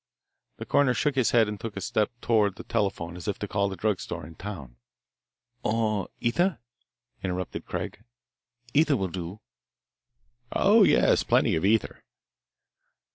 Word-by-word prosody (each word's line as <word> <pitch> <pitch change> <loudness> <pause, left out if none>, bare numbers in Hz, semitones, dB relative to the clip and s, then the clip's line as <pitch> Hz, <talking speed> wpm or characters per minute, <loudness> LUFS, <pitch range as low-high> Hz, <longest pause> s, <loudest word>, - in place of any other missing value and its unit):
The - - -6
coroner 140 -3 +3
shook 150 - +1
his 130 -3 +2
head 115 -2 +4
and 105 -1 -5
took 115 -3 -6
a - - -1
step 105 +3 0
toward 105 -4 +2
the - - -9
telephone 90 -4 -2
as 90 - -8
if 100 - -1
to 105 - -4
call 100 0 0
the 95 - -5
drug 105 -1 0
store 85 -3 -6
in 80 - -11
town. 80 -11 -8 0.8
"Or 110 -2 0
ether?" 175 +10 +1 0.7
interrupted 90 -1 -4
Craig. 110 - -5 0.7
"Ether 150 -2 +4
will 95 -3 -2
do." 90 +3 -6 1.1
"Oh, 215 +3 +5
yes, 200 - +5
plenty - - +3
of 80 - -1
ether." 105 +2 +1
105 Hz, 150 wpm, -27 LUFS, 95-115 Hz, 1.1 s, Oh